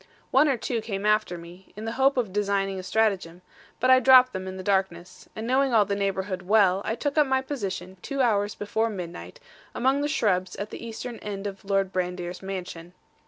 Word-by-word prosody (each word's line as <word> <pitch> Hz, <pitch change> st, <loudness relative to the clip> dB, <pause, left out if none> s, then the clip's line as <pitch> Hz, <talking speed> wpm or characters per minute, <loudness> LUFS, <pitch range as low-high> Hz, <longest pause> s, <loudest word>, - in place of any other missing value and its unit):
One 285 Hz, +3 st, +5 dB
or 265 Hz, -, +1 dB
two 230 Hz, 0 st, -2 dB
came 205 Hz, -2 st, -4 dB
after 210 Hz, -4 st, +2 dB
me, 175 Hz, +3 st, -13 dB
in 215 Hz, +2 st, -7 dB
the 225 Hz, -, -2 dB
hope 270 Hz, +3 st, +2 dB
of 220 Hz, -7 st, -1 dB
designing 195 Hz, -1 st, 0 dB
a -, -, -4 dB
stratagem; 185 Hz, -3 st, 0 dB, 0.4 s
but 255 Hz, +1 st, +3 dB
I 260 Hz, -, +8 dB
dropped 255 Hz, -1 st, +7 dB
them 190 Hz, 0 st, -5 dB
in 190 Hz, 0 st, -6 dB
the 185 Hz, -, -6 dB
darkness; 185 Hz, -2 st, -2 dB
and 220 Hz, -, -5 dB
knowing 260 Hz, 0 st, +2 dB
all 210 Hz, -2 st, +5 dB
the 200 Hz, 0 st, -1 dB
neighbourhood 195 Hz, -1 st, -2 dB
well, 195 Hz, -1 st, +3 dB
I 225 Hz, -, -2 dB
took 285 Hz, +4 st, -1 dB
up 295 Hz, -, +4 dB
my 265 Hz, 0 st, +1 dB
position, 195 Hz, -8 st, -5 dB
two 275 Hz, -1 st, -5 dB
hours 210 Hz, -5 st, +2 dB
before 220 Hz, +2 st, -1 dB
midnight, 180 Hz, -, -7 dB, 0.4 s
among 265 Hz, +3 st, +2 dB
the 290 Hz, -, 0 dB
shrubs 185 Hz, -10 st, 0 dB
at 205 Hz, -, -6 dB
the -, -, -8 dB
eastern 230 Hz, +1 st, -6 dB
end 200 Hz, -1 st, -6 dB
of 200 Hz, -1 st, -6 dB
Lord 195 Hz, -1 st, 0 dB
Brandir's 180 Hz, -1 st, -3 dB
mansion. 180 Hz, -3 st, -7 dB
200 Hz, 210 wpm, -26 LUFS, 185-235 Hz, 0.4 s, I